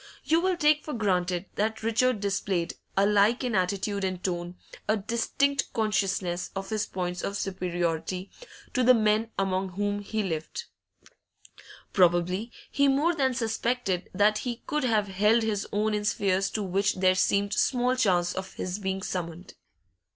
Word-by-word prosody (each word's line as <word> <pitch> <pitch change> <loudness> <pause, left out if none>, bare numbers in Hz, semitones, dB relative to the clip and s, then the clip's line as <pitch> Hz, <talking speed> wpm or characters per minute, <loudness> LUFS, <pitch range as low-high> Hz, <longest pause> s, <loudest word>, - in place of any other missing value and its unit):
You 325 +2 +3
will 370 0 +1
take 300 -2 +3
for 300 - -5
granted 180 -4 0
that 220 +2 -1
Richard 230 0 +2
displayed, 195 -3 -1 0.2
alike 205 +5 +4
in 245 -2 -1
attitude 195 +1 0
and 185 -1 -2
tone, 175 -1 -3 0.3
a 215 - +2
distinct 250 +6 0
consciousness 195 -5 0
of 195 +2 -5
his 215 0 -1
points 180 -1 -3
of 200 - -3
superiority 180 0 -2 0.4
to 255 - +1
the 250 +1 +7
men 215 0 +2
among 190 -1 -1
whom 205 +1 -1
he 215 +1 -2
lived; 160 -4 -4 1.3
probably 180 +4 +2 0.2
he 280 0 +3
more 290 +6 +3
than 265 -5 +1
suspected 225 -4 -1
that 210 +2 +3
he 240 -2 -5
could 300 -3 -1
have 215 -4 +2
held 210 +4 +3
his 210 -2 -1
own 210 +1 +1
in 210 0 -1
spheres 195 -2 +1
to 215 - -2
which 195 +2 +1
there 185 0 +4
seemed 200 +2 +1
small 250 0 +2
chance 180 -8 +2
of 190 0 -6
his 185 +2 -4
being 190 -1 -3
summoned. 175 -1 -5
200 Hz, 155 wpm, -27 LUFS, 185-225 Hz, 1.3 s, the